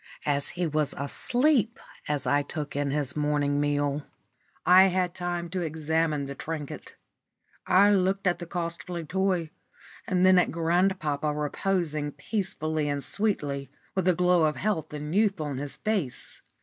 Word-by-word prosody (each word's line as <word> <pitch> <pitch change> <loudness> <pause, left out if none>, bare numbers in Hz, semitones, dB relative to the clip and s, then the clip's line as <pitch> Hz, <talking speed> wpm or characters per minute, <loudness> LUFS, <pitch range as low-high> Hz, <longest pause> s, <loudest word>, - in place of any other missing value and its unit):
As 140 -1 +1
he 180 - +1
was 150 -2 0
asleep 240 - +1 0.3
when 150 -1 +1
I 145 +3 +3
took 150 -1 -5
in 145 0 0
his 140 -1 -1
morning 145 -1 +1
meal, 145 0 0 0.6
I 185 +1 +8
had 180 -1 0
time 175 -1 -3
to 185 -1 -2
examine 160 -2 0
the 140 - -5
trinket. 155 0 -6 0.7
I 200 +2 +6
looked 195 0 +1
at 180 -1 +2
the 175 - -7
costly 170 -1 -4
toy, 180 -2 0 0.6
and 185 -1 +2
then 185 -1 +7
at - - +2
grandpapa 165 -3 +1
reposing 150 0 -1
peacefully 155 -3 -2
and 140 -1 -2
sweetly, 145 -11 -2 0.2
with 190 -1 0
a 180 - +4
glow 180 -2 +4
of 150 -1 +1
health 160 -1 -1
and 150 +2 -5
youth 205 -3 +3
on 145 -4 -3
his 145 0 -4
face. 200 - -2
160 Hz, 150 wpm, -27 LUFS, 145-185 Hz, 0.7 s, I